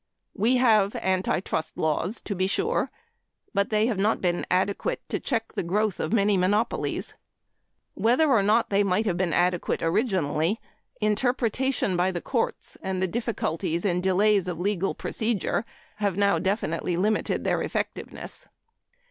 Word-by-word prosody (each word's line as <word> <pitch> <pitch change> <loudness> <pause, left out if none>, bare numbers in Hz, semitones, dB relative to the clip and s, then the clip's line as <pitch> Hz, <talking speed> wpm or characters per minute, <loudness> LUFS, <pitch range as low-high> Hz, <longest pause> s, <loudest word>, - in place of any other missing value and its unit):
We 235 +6 +2
have 215 -5 +4
anti 185 -1 0
trust 160 -4 -3
laws, 160 +7 -1
to 205 - -4
be 185 0 0
sure, 450 - 0 0.6
but 200 -1 +1
they 215 0 +2
have 225 -5 -1
not 210 +3 +2
been 175 -1 -1
adequate 195 - 0
to - - -1
check 225 -4 -2
the - - -1
growth 200 +3 0
of - - -2
many 205 -2 +3
monopolies. 205 +5 0 0.8
Whether 250 +8 +3
or 245 -7 +4
not 215 +3 +2
they 200 0 +4
might 200 +2 +1
have 190 -5 +1
been 175 -1 0
adequate 175 +2 +1
originally, 170 - +1 0.4
interpretation 245 0 +1
by 180 +2 +2
the 175 - -3
courts 235 +6 -2
and 190 -1 -2
the 190 - +1
difficulties 180 -6 -2
and 180 -2 +1
delays 190 +1 +3
of 175 -2 -4
legal 195 0 0
procedure 220 -1 -1 0.3
have 200 -3 -1
now 200 -4 +3
definitely 180 -2 -1
limited 210 +4 0
their - - +1
effectiveness. - - -5
200 Hz, 150 wpm, -26 LUFS, 180-220 Hz, 0.8 s, have